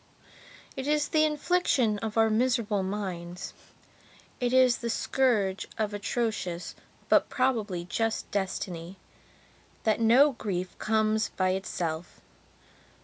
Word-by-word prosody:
It 265 +1 -4
is 300 0 +1
the 310 0 +4
infliction 300 - +1
of 220 0 -4
our 225 0 +4
miserable 225 -3 +1
mindsit 185 -3 -5 0.9
is 250 0 +4
the 235 - -3
scourge 220 -5 +1
of 215 -2 -1
atrocious 205 -4 -2 0.3
but - - +4
probably 220 -9 0
just 225 +4 -2
destiny 185 -2 -3 0.9
that 220 0 +2
no 250 +6 +6
grief 185 -7 -4
comes 220 0 +1
by 185 -1 0
itself. 175 -3 -4
220 Hz, 105 wpm, -28 LUFS, 190-245 Hz, 0.9 s, no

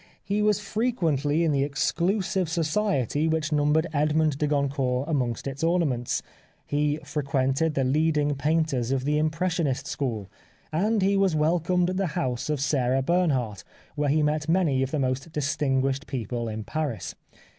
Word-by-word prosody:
He 205 +1 0
was 210 -1 +3
frequently 170 - 0
in 165 - +2
the 140 -1 +2
ex 140 0 0
clusive 190 0 0
society 160 - 0
which 160 0 0
numbered 150 +2 +2
Edmond 150 0 +1
de 150 - +1
Goncourt 140 -2 0
amongst 125 -7 -1
its 140 +2 -4
ornaments; 160 -8 0 0.4
he 145 0 0
frequented 140 +1 0
the 135 - +2
leading 150 +2 +2
painters 150 -4 0
of 135 -1 0
the 150 +1 +2
impressionist 155 -2 0
school; 115 -8 -3 0.5
and 205 +5 +1
he 200 +1 +3
was 195 -4 +2
welcomed 175 +3 +2
at 185 - -3
the 195 -1 +1
house 125 +2 -2
of 150 -2 0
Sarah 135 -2 +1
Bernhardt 135 - 0 0.3
where 145 -1 0
he 150 +2 +3
met 150 +1 0
many 165 -7 +2
of 135 - 0
the 155 - -2
most 135 +3 -1
distinguished 135 -1 0
people 120 -2 -3
in 110 0 -4
Paris. 150 -3 -3
150 Hz, 155 wpm, -26 LUFS, 135-165 Hz, 0.5 s, was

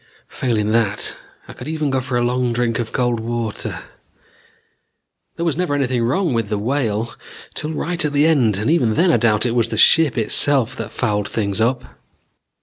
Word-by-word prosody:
Failing 110 -4 -1
that, 110 -3 0 0.3
I - - -10
could - - -9
even 155 -2 -1
go 130 -1 +1
for 130 -1 -2
a 120 - +1
long 125 0 0
drink 120 -1 0
of 115 -2 -3
cold 120 -2 0
water. 115 -1 -4 1.5
There 170 - -3
was 165 - 0
never 180 -5 0
anything 130 -3 0
wrong 140 +7 +1
with 115 -3 -1
the 105 - -1
Whale 115 -1 -1 0.4
till 155 +1 -3
right 175 +2 -2
at 150 - 0
the 145 +1 +3
end 125 -11 +3
and 110 +8 0
even 125 -10 +2
then 175 +1 +4
I - - +4
doubt 110 -1 +2
if - - +2
it - - -2
was 115 -1 +2
the 110 - -3
ship 155 +3 +5
itself 130 +2 +2
that - - -5
fouled 105 -4 -1
things 105 -1 -2
up. 125 +3 +1
120 Hz, 195 wpm, -20 LUFS, 110-145 Hz, 1.5 s, ship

